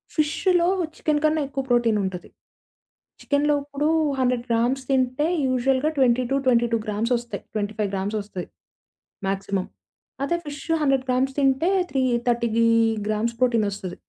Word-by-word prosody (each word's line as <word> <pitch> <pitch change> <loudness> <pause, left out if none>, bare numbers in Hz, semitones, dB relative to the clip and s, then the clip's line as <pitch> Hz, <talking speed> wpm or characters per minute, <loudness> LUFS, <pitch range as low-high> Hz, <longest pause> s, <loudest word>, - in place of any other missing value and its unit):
ఫిష్షులో 340 +3 +2 0.3
chicken 300 -1 0
కన్నా 310 0 +2
ఎక్కువ 270 0 -3
protein 235 -3 +3
ఉంటది. 190 -2 -5 0.9
చికెన్‌లో 290 +1 +1
ఇప్పుడు 290 +1 -2 0.3
100 250 -2 +1
గ్రామ్స్ 240 +4 +1
తింటే 265 +2 +1 0.2
యూజువల్‌గా 260 +3 +1
20-22 250 -2 +2
గ్రామ్సొస్తయి. 235 +3 -2
25 210 -1 -2
గ్రామ్సొస్తయి. 200 -1 -4 0.8
మాక్సిమం. 195 -1 -2 0.6
అదే 340 +5 0
ఫిషు 290 +3 -3
100 270 -2 +2
గ్రామ్స్ 260 +1 +1
తింటే 275 +5 +2 0.2
త్రీ 270 - +1 0.3
థర్టీగీ 235 -1 +2 0.4
గ్రామ్స్ 215 +2 -1
ప్రోటీనొస్తది. 205 -7 0
250 Hz, 110 wpm, -24 LUFS, 220-275 Hz, 0.9 s, protein